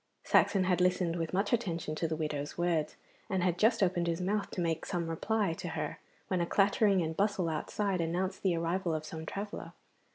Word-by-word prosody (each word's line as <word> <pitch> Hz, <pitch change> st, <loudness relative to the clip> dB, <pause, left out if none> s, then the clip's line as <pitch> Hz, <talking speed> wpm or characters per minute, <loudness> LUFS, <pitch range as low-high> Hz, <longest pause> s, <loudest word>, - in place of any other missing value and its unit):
Saxon 195 Hz, -2 st, +4 dB
had 180 Hz, -1 st, +2 dB
listened 180 Hz, -2 st, +2 dB
with 165 Hz, -2 st, -2 dB
much 195 Hz, +4 st, 0 dB
attention 175 Hz, -9 st, -1 dB
to 165 Hz, +2 st, -1 dB
the 160 Hz, -, -2 dB
widow's 150 Hz, -2 st, -3 dB
words, 170 Hz, -3 st, 0 dB, 0.3 s
and 190 Hz, -3 st, 0 dB
had 175 Hz, -1 st, +1 dB
just 220 Hz, -1 st, +4 dB
opened 175 Hz, -2 st, +1 dB
his 165 Hz, -1 st, 0 dB
mouth 200 Hz, +3 st, -1 dB
to -, -, -6 dB
make 165 Hz, -2 st, 0 dB
some 175 Hz, -3 st, -2 dB
reply 200 Hz, +3 st, 0 dB
to 170 Hz, -, -6 dB
her 150 Hz, -2 st, -4 dB, 0.3 s
when 185 Hz, -2 st, 0 dB
a -, -, +2 dB
clattering 200 Hz, -1 st, +3 dB
and 160 Hz, 0 st, -3 dB
bustle 200 Hz, -2 st, +1 dB
outside 185 Hz, +4 st, -1 dB
announced 180 Hz, +3 st, -1 dB
the 185 Hz, -3 st, +2 dB
arrival 170 Hz, 0 st, 0 dB
of 155 Hz, 0 st, -4 dB
some 160 Hz, 0 st, -7 dB
traveller. 205 Hz, +1 st, -5 dB
175 Hz, 200 wpm, -32 LUFS, 165-195 Hz, 0.3 s, Saxon